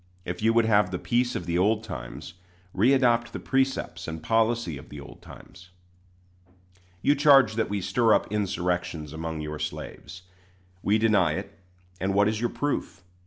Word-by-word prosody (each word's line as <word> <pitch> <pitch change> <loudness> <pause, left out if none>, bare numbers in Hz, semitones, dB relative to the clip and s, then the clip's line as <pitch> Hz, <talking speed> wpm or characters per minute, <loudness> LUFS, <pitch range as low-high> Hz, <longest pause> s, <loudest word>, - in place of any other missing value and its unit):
If 90 +2 -5
you 110 +1 +3
would 115 -1 +4
have 105 -3 +3
the 90 - -3
peace 120 +5 0
of 90 - -4
the 85 0 0
old 105 +3 +2
times, 65 - -8 0.4
readopt 120 +1 +3
the - - -4
precepts 135 0 -1
and 80 -1 -6
policy 115 -6 +1
of - - -14
the 75 - -9
old 70 - -12
times. 90 0 -14 1.3
You 145 - +5
charge 140 -4 +5
that 110 0 -1
we 100 -1 -2
stir 115 +3 +3
up - - -2
insurrections 90 -6 -2
among 80 0 -5
your 75 0 -5
slaves. 90 0 -7 0.6
We 105 +2 +2
deny 110 -1 +3
it; - - -6 0.4
and 95 +1 -1
what 100 +1 +4
is 110 0 -1
your 120 - +1
proof? 145 -8 -3
105 Hz, 165 wpm, -26 LUFS, 90-115 Hz, 1.3 s, You